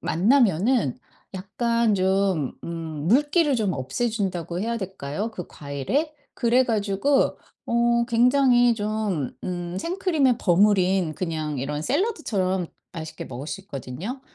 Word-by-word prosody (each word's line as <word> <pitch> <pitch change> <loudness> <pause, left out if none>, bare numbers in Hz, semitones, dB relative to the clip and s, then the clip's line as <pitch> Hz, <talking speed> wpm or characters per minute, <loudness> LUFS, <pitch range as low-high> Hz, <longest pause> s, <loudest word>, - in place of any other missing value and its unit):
만나면은 210 - +2 0.4
약간 230 +3 0
좀 190 -6 +1
음 160 -2 -5
물기를 295 - +3
좀 210 -6 0
없애 145 - -2
준다고 180 -6 -3
해야 230 +2 -1
될까요, 190 0 -4
그 180 -6 -7
과일의? 150 - -3 0.2
그래 245 +2 +3
가지고 220 +4 +1 0.3
어 235 0 +2
굉장히 245 0 +4
좀 210 - -2
음 175 -1 -4
생크림에 325 - +1
버무린 190 -3 +3
그냥 155 -5 -3
이런 145 +3 -3
샐러드처럼 210 - 0 0.3
맛있게 160 -1 -7
먹을 130 +4 -7
수 160 +6 -5
있거든요. 175 - -6
200 Hz, 265 characters per minute, -24 LUFS, 170-240 Hz, 0.4 s, 굉장히